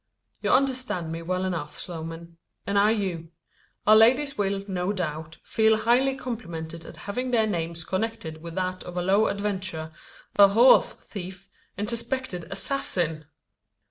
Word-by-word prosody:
"You - - -1
understand 255 -11 +1
me 165 +1 -4
well 185 +2 -1
enough, 170 -5 -4
Sloman; 165 0 -7 0.3
and 200 +1 +2
I 205 +1 +5
you. 185 -7 -2 0.6
Our 215 - +7
ladies 260 +6 +5
will, 195 -1 -1
no 185 0 -1
doubt, 160 -4 -4
feel 220 0 +3
highly 245 +5 +3
complimented 170 -11 -6
at - - -11
having 250 +6 -2
their 230 -3 +3
names 170 -4 -3
connected 185 -5 -3
with 170 0 -8
that 185 0 -2
of 180 0 -8
a 180 - 0
low 200 +4 +3
adventurer, 185 -6 -3 0.5
a 200 -1 +9
horse 230 +6 +6
thief, 190 0 -9 0.3
and 205 +1 -2
suspected 235 -6 -3
assassin!" 170 - 0
190 Hz, 145 wpm, -26 LUFS, 170-225 Hz, 0.6 s, a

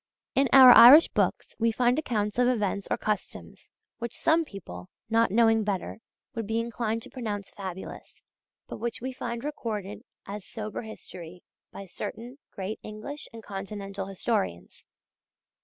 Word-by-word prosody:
In 275 -1 +2
our 260 -2 +10
Irish 270 +7 +10
books - - -1
we 230 0 +2
find 245 +4 +2
accounts 210 -6 -2
of 250 - +4
events 205 -5 -1
or - - 0
customs, 210 -3 -5 0.3
which 235 -1 -6
some 325 +1 +3
people 90 - -10 0.2
not 230 0 +3
knowing 225 +1 +3
better 205 0 -3 0.3
would 225 -4 -4
be 225 +1 0
inclined 230 -1 -3
to - - -10
pronounce 210 -6 -5
fabulous, 190 -2 -9 0.4
but - - -8
which 235 0 -3
we 260 +2 -5
find 235 -1 -5
recorded 210 -8 -5 0.2
as 205 0 -7
sober 215 0 -6
history 180 -6 -10 0.3
by 195 - -9
certain 230 +8 -7
great 195 +2 -5
English 215 +8 -8
and 225 -1 -11
Continental 195 -1 -6
historians. 95 - -3
220 Hz, 145 wpm, -27 LUFS, 200-240 Hz, 0.4 s, our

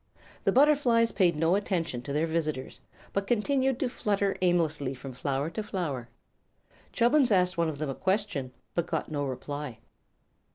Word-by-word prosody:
The - - +4
butterflies 260 -5 +4
paid 175 -5 +3
no 165 +3 +2
attention 170 -10 -1
to 140 - -6
their 150 +3 +1
visitors, 155 -5 -3 0.3
but 200 0 -1
continued 260 +3 +1
to 265 - +2
flutter 200 -4 0
aimlessly 160 -7 +1
from 130 +1 -8
flower 140 +4 -2
to 215 - -3
flower. 155 - -3 0.8
Chubbins 250 +1 +3
asked 180 -2 +3
one 170 -1 +1
of 150 - -5
them 150 -1 -2
a - - -3
question, 190 -8 -1 0.2
but 170 -1 -1
got 160 -2 -2
no 145 -1 -1
reply. 145 -1 -5
170 Hz, 160 wpm, -28 LUFS, 145-210 Hz, 0.8 s, The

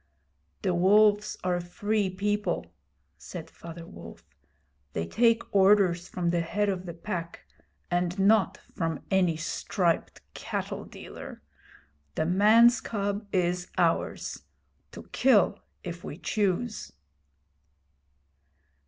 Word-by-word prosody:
'The 185 - +1
Wolves 205 +4 +4
are 180 -1 +1
a - - -3
free 205 +3 -1
people,' 205 +2 -1 0.5
said - - -8
Father 165 0 -10
Wolf. 85 - -12 0.7
'They 80 - -2
take 230 - +1
orders 190 -3 +4
from 175 -2 -1
the 175 - +1
Head 205 +5 0
of 185 -2 -3
the 170 - -5
Pack, 170 -2 -5 0.5
and 175 +1 0
not 195 -1 +3 0.2
from 165 -3 -2
any 180 -4 +3
striped 170 +1 -1
cattle - - -4
dealer. - - -10 0.7
The 155 - 0
man's 220 +6 +5
cub 205 -1 -3
is 180 -1 0
ours - - 0 0.5
to - - -10
kill 245 -7 +4 0.2
if 175 -1 -7
we 145 - -7
choose.' 205 - -1
185 Hz, 110 wpm, -28 LUFS, 175-210 Hz, 0.7 s, man's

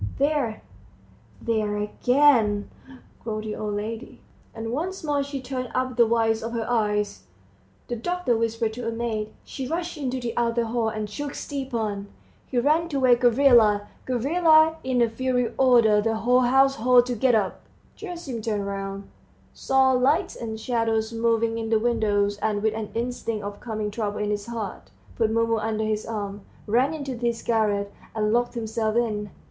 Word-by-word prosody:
"There... 280 - 0 0.8
there... 215 - -1
again," 220 -1 +3 0.5
groaned 215 -2 -3
the 215 -1 -4
old 210 -1 -3
lady, 220 +3 -5 0.3
and 225 0 -5
once 345 +9 -3
more 290 -2 +1
she 280 0 -4
turned 255 -1 -4
up 255 -1 -1
the 235 -1 +5
whites 225 -1 +2
of 230 +1 -5
her 230 -1 -2
eyes. 210 -3 0 0.6
The 240 - -3
doctor 350 -1 0
whispered 225 0 -1
to 235 0 -5
a - - 0
maid, 225 -2 -3
she 265 -2 -6
rushed 335 +1 -3
into 260 -2 -2
the 240 -2 -3
outer 235 0 +1
hall, 225 0 0
and 215 -1 -4
shook 285 +7 -5
Stepan, 230 -8 -3 0.4
he 255 - -3
ran 310 +7 +2
to 280 -4 -1
wake 250 -2 +4
Gavrila, 235 -5 +5 0.2
Gavrila 315 +5 +4
in 255 -2 +2
a - - +3
fury 250 +1 -1
ordered 230 -5 +4
the 225 0 +1
whole 245 +3 +3
household 255 -2 +4
to 250 - -2
get 245 +1 +3
up. 200 -4 -1 0.3
Gerasim 340 - -6
turned 210 -2 -2
round, 195 0 -5 0.5
saw 265 0 +3
lights 260 +4 +2
and 220 -1 -5
shadows 225 -1 0
moving 230 0 +1
in 225 -1 -3
the 225 - +4
windows, 205 -3 +1
and 210 -1 -1
with 220 -1 +2
an 220 -1 -4
instinct 230 -2 -3
of 205 0 -6
coming 215 -3 -4
trouble 210 -1 -3
in 210 0 -1
his 205 0 -3
heart, 210 - -6 0.3
put 225 -2 +1
Mumu 230 0 +1
under 220 0 -1
his 215 0 -2
arm, 205 -2 -4 0.2
ran 255 +8 +2
into 280 -4 -5
his 235 -1 -2
garret, 205 -3 0 0.2
and 210 0 +1
locked 240 +1 +1
himself 220 -1 -2
in. 210 -3 0
230 Hz, 170 wpm, -25 LUFS, 215-255 Hz, 0.8 s, the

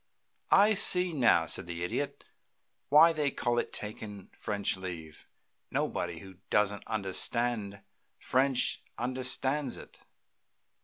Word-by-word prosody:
"I 210 +2 +5
see 180 -3 +5
now," 115 - +3
said 80 - -3
the 85 0 -5
Idiot, 90 - -4 0.6
"why 160 +4 +7
they 150 -2 0
call 120 -2 -1
it - - -3
taking 105 -2 -6
French 100 -1 -2
leave. 85 -5 -9 0.4
Nobody 85 -2 -3
who 95 -2 -13
doesn't 105 -1 0
understand 105 0 -1 0.4
French 130 0 0 0.2
understands 130 +2 -1
it. - - -13
110 Hz, 110 wpm, -30 LUFS, 95-135 Hz, 0.6 s, why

